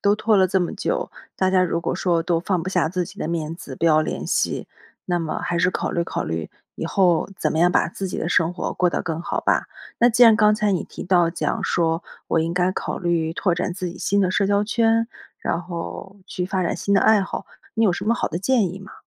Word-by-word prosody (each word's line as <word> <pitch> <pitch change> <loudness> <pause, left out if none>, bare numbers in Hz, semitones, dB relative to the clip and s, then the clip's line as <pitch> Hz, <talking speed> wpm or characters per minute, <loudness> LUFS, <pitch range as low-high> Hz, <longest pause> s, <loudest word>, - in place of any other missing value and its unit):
都 200 0 +3
拖 215 0 +2
了 190 - +5
这 190 +1 +1
么 175 - -1
久， - - -2 0.3
大 185 0 +2
家 185 -1 +4
如 170 -1 0
果 - - -2
说 170 -2 +1
都 170 0 +1
放 180 -1 -1
不 185 - -4
下 180 -3 +1
自 180 +1 -1
己 - - -13
的 - - -3
面 165 -1 -2
子， 145 -5 -9
不 - - -2
要 155 -2 +5
联 155 - -3
系， - - -1 0.4
那 175 -1 +1
么 160 -2 -3
还 175 - -1
是 180 +1 +3
考 - - -2
虑 170 - -1
考 - - -3
虑 80 -1 -3 0.3
以 - - -3
后 180 -4 +2
怎 - - 0
么 160 - -1
样 175 +2 +5
把 - - +2
自 195 - -5
己 - - -4
的 165 - -2
生 170 -1 +2
活 - - -3
过 180 - +2
得 - - -2
更 165 -1 -3
好 - - -2
吧。 - - +1 0.3
那 240 - +6
既 240 +1 +3
然 225 -2 +8
刚 210 -1 +5
才 210 -1 +1
你 180 - -1
提 - - -9
到 175 -2 +3
讲 165 - -2
说， 165 -1 0 0.3
我 165 - +2
应 165 +1 -1
该 180 0 +2
考 - - -4
虑 170 -2 0
拓 175 +1 0
展 180 0 -2
自 185 -1 -4
己 180 - -11
新 200 +1 +1
的 185 -2 +2
社 200 0 +1
交 200 +1 +2
圈， 225 +1 +2 0.3
然 165 - -2
后 175 +2 -7
去 180 - -3
发 190 -1 -1
展 170 - -1
新 200 - 0
的 195 - +5
爱 220 -2 +5
好， 190 - -4 0.3
你 225 - +2
有 190 - +4
什 - - -4
么 230 - +2
好 - - -1
的 170 - -3
建 205 -3 +1
议 190 - -8
吗？ 195 -1 -12
180 Hz, 285 characters per minute, -22 LUFS, 170-200 Hz, 0.4 s, 然